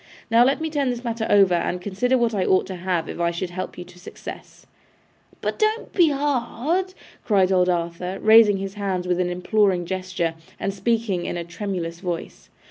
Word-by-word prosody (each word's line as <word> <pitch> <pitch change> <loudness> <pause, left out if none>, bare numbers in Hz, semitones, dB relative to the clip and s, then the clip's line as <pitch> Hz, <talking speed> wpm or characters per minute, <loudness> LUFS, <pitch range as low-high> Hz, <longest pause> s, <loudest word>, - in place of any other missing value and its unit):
'Now, 230 +1 +6
let 270 +4 +2
me 320 0 -3
turn 285 -4 0
this 245 0 -3
matter 230 -2 -2
over, 195 -3 +5
and 175 +1 0
consider 205 +8 0
what 235 -2 +1
I 195 -3 +1
ought 185 - +3
to 190 - -6
have 175 -2 -2
if - - -7
I 170 0 +2
should 175 +1 -4
help 185 +1 -5
you 180 - -6
to 180 0 -17
success.' 180 - -10 0.8
'But - - -3
don't 435 +1 0
be 345 -4 +5
hard,' 290 +6 -1 0.3
cried 195 -3 +3
old 180 -1 +3
Arthur, 175 +2 -2
raising 220 -2 +6
his 195 0 -5
hands 190 -3 -2
with 180 0 +1
an 180 -1 +1
imploring 180 0 +1
gesture, 185 -2 -2 0.3
and 195 - -2
speaking, 200 -3 -1
in - - -3
a 170 - -3
tremulous 170 -2 -5
voice. 175 -3 -6
195 Hz, 195 wpm, -23 LUFS, 180-230 Hz, 0.8 s, Now